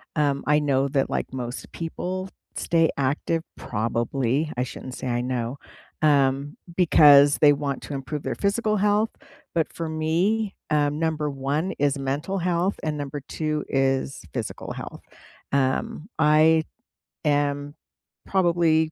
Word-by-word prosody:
Um, 145 -2 +1
I 150 0 +4
know 140 -2 +1
that, 135 -1 +1
like, - - -2
most 125 -1 -5
people 185 +3 -4 0.3
stay 165 -1 +2
active, 145 +4 0
probably, 120 +6 -1
I 125 - +1
shouldn't 130 0 -7
say - - -5
I 120 0 0
know, 125 0 -2 0.4
um, 140 -1 +2 0.2
because 145 -5 +7
they 145 -1 +7
want 140 -2 -3
to - - -6
improve 140 +2 -4
their - - -2
physical 215 +2 +1
health. 210 +2 +2 0.4
But 165 -2 +1
for 165 - -4
me, 175 +7 0
um, 150 0 +1
number 155 -2 0
1 145 +6 -1
is 145 0 +2
mental 140 +8 -2
health, 180 +2 +1
and 155 -1 -1
number 145 0 -5
2 155 -2 -2
is 135 -1 0
physical - - -4
health. - - -8 0.5
Um, 140 +6 0
I 155 +1 +5 0.6
am 145 0 0 0.5
probably 170 -4 +2
150 Hz, 135 wpm, -24 LUFS, 135-165 Hz, 0.6 s, because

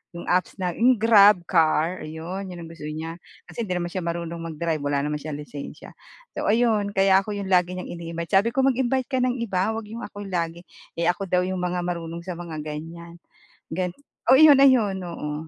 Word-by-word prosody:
'yong 170 - -6
apps 180 +1 +1
na 180 -3 -2
'yong 245 +6 +4
GrabCar, 185 -6 +4
ayun. 175 +5 -6
'Yon 180 -2 -8
ang 165 - -10
gusto 155 -2 -8
niya 160 +2 -6 0.2
kasi 230 -3 -6
di 180 - -1
naman 175 -1 -3
siya 185 - -3
marunong 170 0 -4
mag-drive, 160 0 -2
wala 140 0 0
naman 150 0 -2
siyang 150 0 -6
lisensiya. 145 -1 -9 0.4
So - - -4
ayun, 215 -2 +2
kaya 195 0 +5
ako 205 +1 -5
'yong 195 -1 -4
lagi 180 0 +3
niyang 180 - -6
ini-invite. 170 -1 -6
Sabi 230 +4 -2
ko, 265 - +3
"Mag-invite 260 0 +1
ka 260 - +1
ng 250 0 +1
iba 220 -3 -1
'wag 225 - -4
'yong 230 +2 -7
ako 205 0 -9
lagi." 170 -1 -3 0.3
Eh, 170 +1 +1
ako 195 +2 -6
daw 180 0 +2
'yong 185 0 -2
mga 180 0 -2
marunong 170 -1 -4
sa 180 -2 -6
mga 170 -2 -7
ganyan. 165 +3 -8 0.5
Gan 180 +1 -1 0.4
oo, - - +9
iyon, 295 -3 +8
ayun, 230 -8 +4
oo. 165 -4 -5
180 Hz, 200 wpm, -24 LUFS, 170-205 Hz, 0.5 s, oo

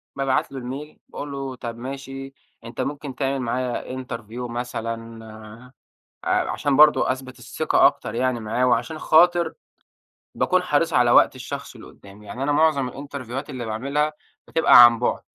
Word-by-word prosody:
بابعت 135 -1 0
له 135 - -6
الMail 135 +5 -7
باقول 145 - -7
له 135 -2 -5
طب 120 -2 -7
ماشي، 135 +2 -7 0.3
أنت 115 0 -6
ممكن 145 -2 -5
تعمل 135 -1 -1
معايا 125 +1 -3
Interview 120 0 -7
مثلًا، 115 -2 -6 0.7
ع - - +1
عشان 140 -2 0
برضه 150 -3 +5
أثبت 130 -1 -9
الثقة - - +2
أكتر 110 - -1
يعني 125 0 0
معاه، 115 +4 0
وعشان 125 +5 0
خاطر 175 +2 +4 0.8
باكون 185 0 +2
حريص 160 0 +1
على 125 -2 +4
وقت - - +5
الشخص 130 +2 -7
اللي 115 - -12
قدّامي، 100 +1 -16
يعني 125 +6 -6
أنا 145 - 0
معظم 145 -3 +2
الإنترفيوهات 135 0 -7
اللي 125 -4 -5
باعملها 140 +7 -1 0.3
بتبقى 140 -6 +7
عن 120 -1 +3
بُعد، 120 - -1
130 Hz, 155 wpm, -23 LUFS, 120-140 Hz, 0.8 s, بتبقى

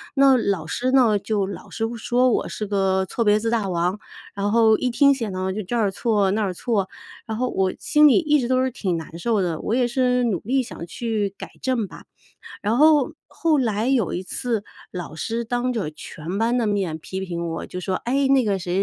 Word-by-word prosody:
那 270 -1 +6
老 195 -8 -1
师 250 +10 -1
呢， 235 -6 +4
就 205 -1 -1
老 195 - -8
是 225 - -2
说 245 +3 +2
我 - - 0
是 215 - -4
个 190 -2 +1
错 230 +5 -2
别 210 0 +4
字 225 +1 -1
大 225 -4 0
王， 180 +4 0 0.3
然 205 +1 -1
后 225 -1 +5
一 250 - 0
听 280 +3 +5
写 230 -6 -3
呢 185 0 -2
就 215 - -3
这 220 +7 -4
儿 210 -4 +2
错 205 -2 +1
那 215 +2 0
儿 190 -3 -1
错， 200 -1 -1 0.4
然 220 -1 -4
后 255 0 0
我 190 -1 0
心 300 0 +5
里 285 - +5
一 300 -4 +2
直 240 - -1
都 255 0 +2
是 260 - 0
挺 185 -6 -2
难 160 +1 -8
受 220 +2 +1
的， 170 -4 -1
我 225 - -1
也 245 -1 +2
是 250 0 +1
努 205 -8 0
力 260 +5 0
想 225 -8 -8
去 210 0 -2
改 - - -8
正 245 -6 0
吧。 - - -13 0.6
然 215 +3 0
后 300 0 +5 0.2
后 325 -2 +1
来 225 -2 0
有 245 -10 +1
一 180 - -3
次 220 +2 -3 0.3
老 175 -4 -6
师 230 +9 -3
当 245 +2 -1
着 205 -10 -2
全 165 +4 -7
班 235 +3 +1
的 230 - +1
面 195 -6 -1
批 190 +4 -6
评 170 -2 -4
我 165 - -4
就 180 - -7
说： 185 +1 -2
“哎， 270 +3 +1
那 270 -2 +4
个 200 -3 0
谁 175 0 -3
220 Hz, 240 characters per minute, -23 LUFS, 190-250 Hz, 0.6 s, 那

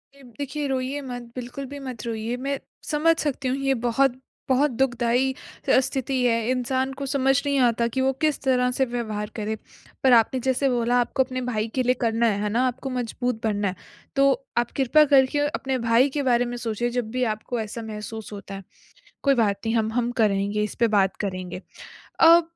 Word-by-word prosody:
ये 280 - -17 0.2
देखिए, 285 +1 -3
रोइए 265 +2 -2
मत। 245 -2 -6
बिल्कुल 250 +2 -6
भी 285 +2 -8
मत 250 -5 -7
रोइए, 225 +1 -3
मैं 275 +1 -2 0.3
समझ 325 +2 +3
सकती 280 -2 -2
हूँ 255 +2 0
ये 270 0 +1
बहुत, 255 +2 +2 0.3
बहुत 270 +2 +3
दुखदायी 245 +1 +1 0.4
अ, - - +6
स्थिति 265 0 -1
है। 230 -1 +1
इंसान 260 +1 0
को 280 - -3
समझ 270 0 +2
नहीं 280 -1 +1
आता 235 0 +1
कि 260 - +1
वो 265 0 +3
किस 305 -2 0
तरह 250 -1 +2
से 265 +1 +1
व्यवहार 220 -3 -3
करे। 215 0 -2 0.5
पर 260 -2 +6
आपने 235 +3 +4
जैसे 265 +2 +1
बोला 245 0 +2
आपको 265 +2 +1
अपने 255 0 -5
भाई 215 -1 -1
के 255 - +2
लिए 250 +1 +3
करना 230 0 +2
है। 205 -2 0
है 210 - 0
ना? 240 +4 +2
आपको 260 +2 -4
मज़बूत 245 -1 -2
बनना 205 -2 0
है। 185 - -3 0.4
तो 275 0 +5 0.3
आप 240 -1 +1
कृपया 290 +3 +5
करके 265 +2 +4
अपने 265 -3 -2
भाई 240 +5 +5
के 285 - +1
बारे 245 0 +3
में 240 - -4
सोचिए, 235 +1 -2
जब 240 -2 -2
भी 255 +1 0
आपको 230 +2 -5
ऐसा 220 +2 -5
महसूस 215 0 -7
होता 200 -1 -8
है। 195 - -8 0.6
कोई 275 -1 +4
बात 200 -1 0
नहीं 225 +1 0
हम 220 -1 +1
हम 240 0 0
करेंगे 205 0 +1
इस 210 - -4
पर 235 - +4
बात 195 -1 +2
करेंगे। 185 -1 -5 0.6
अ, 335 +1 +8
245 Hz, 200 wpm, -24 LUFS, 225-265 Hz, 0.6 s, अ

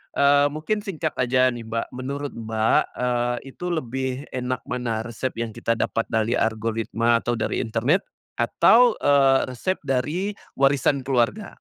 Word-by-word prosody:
eee, 140 0 +5
mungkin 185 +8 -1
singkat 170 -7 -3
aja 130 0 +3
nih 115 -2 -8
Mbak, 115 +1 -2
menurut 140 +3 -5
Mbak, 110 -1 +1
eee, 120 -1 0 0.2
itu 180 - -6
lebih 130 -4 -3
enak 125 -1 -3
mana, 120 -3 -3
resep 120 +2 -4
yang 115 -1 -3
kita 115 +1 -1
dapat 115 0 -1
dari 110 +1 0
algoritma 115 +1 +1
atau 120 +1 -1
dari 115 - -2
internet 120 - 0 0.3
atau, 240 -1 +5
eee, 135 -2 +5
resep 185 +10 -1
dari 150 +9 -1 0.2
warisan 135 0 +2
keluarga? 135 - 0
125 Hz, 145 wpm, -23 LUFS, 115-145 Hz, 0.3 s, eee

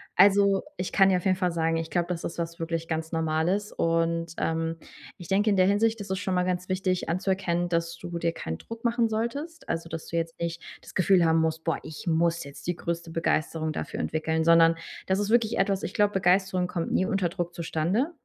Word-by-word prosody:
Also, 200 0 +5
ich 180 - -3
kann 195 -1 +5
dir 185 - +3
auf 180 - -6
jeden 185 -1 +3
Fall 180 -2 +1
sagen, 165 0 +1
ich 165 0 -3
glaube, 175 0 0
das 170 -2 -3
ist 170 - -5
was 170 0 -4
wirklich 165 0 -3
ganz 160 0 -2
Normales. 165 +6 0
Und, 165 0 0
ähm, 165 0 -1 0.4
ich 175 - -10
denke, 205 +3 +3
in 200 - +3
der 185 - +5
Hinsicht 220 +2 +2
ist 200 -1 -6
es 190 - -1
schon 190 -2 -2
mal 180 - +2
ganz 180 0 -2
wichtig 185 -1 0
anzuerkennen, 180 -1 0
dass 170 0 -1
du 175 -1 -6
dir 170 0 0
keinen 80 - -5
Druck 230 0 -9
machen 235 0 +2
solltest. 280 +10 -4
Also, 165 0 -2
dass 165 -1 -6
du 170 - -3
jetzt 165 0 -2
nicht 170 0 -3 0.2
das - - -13
Gefühl 185 -1 +4
haben 160 0 +4
musst: 160 0 -1
„Boah, 165 - 0
ich 155 - -9
muss 170 +1 +2
jetzt 140 +4 -11
die 175 - 0
größte 170 0 -4
Begeisterung 160 -1 0
dafür - - -5
entwickeln,“ 160 0 -1
sondern 165 0 +6 0.3
das 190 0 +2
ist 205 0 -1
wirklich 235 -1 +3
etwas 195 0 +1
ich - - -4
glaube, 205 0 +2
Begeisterung 185 -1 +2
kommt 170 -2 -3
nie 185 - +2
unter 195 -4 0
Druck 175 -1 -4
zustande, 175 - 0
175 Hz, 225 wpm, -27 LUFS, 165-195 Hz, 0.4 s, sondern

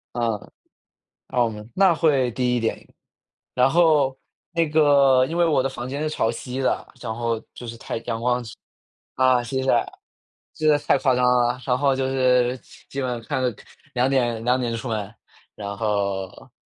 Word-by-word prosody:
嗯。 115 -3 -2 0.8
啊， 125 -2 +2
我 115 - +1
们 105 0 -9
那 190 -3 +4
会 140 -7 +2
低 125 0 0
一 - - 0
点。 115 - -3 0.7
然 125 +1 +4
后 150 -5 +3 0.4
那 165 -1 +1
个 140 -4 +5
因 165 +5 -4
为 175 - +4
我 150 -5 +2
的 135 - 0
房 125 -1 -6
间 140 +3 -3
是 155 - 0
朝 115 - 0
西 125 +3 -5
的， 130 - 0
然 115 -2 -4
后 115 -1 -2
就 120 - -9
是 115 - -7
太 - - -5
阳 115 -1 -3
光 125 0 0 0.7
啊， 130 -1 +4
西 130 +2 -2
晒。 120 -3 +3 0.7
真 155 0 +1
的 150 - +5
是 - - -12
太 - - +4
夸 130 -3 +2
张 125 0 +2
了， 125 0 +2
然 125 - +2
后 140 -1 +2
就 130 0 -1
是 125 -1 +2 0.3
基 140 - -4
本 125 -2 -2
看 130 - -2
着 125 -4 0 0.4
2:00 125 -3 +1
2:00 125 -2 +1
出 115 - -6
门。 105 -3 -3 0.4
然 100 -1 -6
后 100 -3 -2
125 Hz, 185 characters per minute, -23 LUFS, 115-135 Hz, 0.8 s, 个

